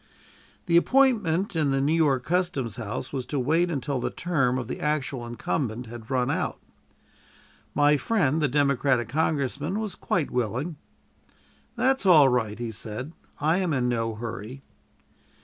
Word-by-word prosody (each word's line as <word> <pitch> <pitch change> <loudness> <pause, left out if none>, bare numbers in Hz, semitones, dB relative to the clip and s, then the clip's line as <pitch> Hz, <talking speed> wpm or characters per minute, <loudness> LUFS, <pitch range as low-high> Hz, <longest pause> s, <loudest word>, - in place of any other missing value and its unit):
The 170 -2 +4
appointment 205 -6 +3
in 155 -3 +1
the 135 0 +1
New 140 +3 +2
York 145 -6 +2
Custom 175 -5 0
House 110 +3 -5
was 130 -3 -3
to 145 - -2
wait 160 +7 +2
until 140 -3 -2
the - - -1
term 135 -8 0
of 125 -3 -4
the - - -5
actual 140 -5 -2
incumbent 120 0 -3
had 115 -1 -10
run 125 -2 +1
out. - - -2 1.2
My 145 0 +4
friend, 160 -5 +1
the 150 - +3
Democratic 140 -3 +1
congressman, 155 - -1
was 215 -4 -3
quite 165 -4 -1
willing. 125 - -2 1.0
"That's 255 -2 +1
all 155 -7 +7
right," 115 -4 0
he 120 -1 -4
said; 110 +8 -5 0.3
"I 155 +4 +2
am 180 -4 0
in 125 -3 +1
no 115 -2 -1
hurry." 115 +3 -7
140 Hz, 150 wpm, -26 LUFS, 125-165 Hz, 1.2 s, all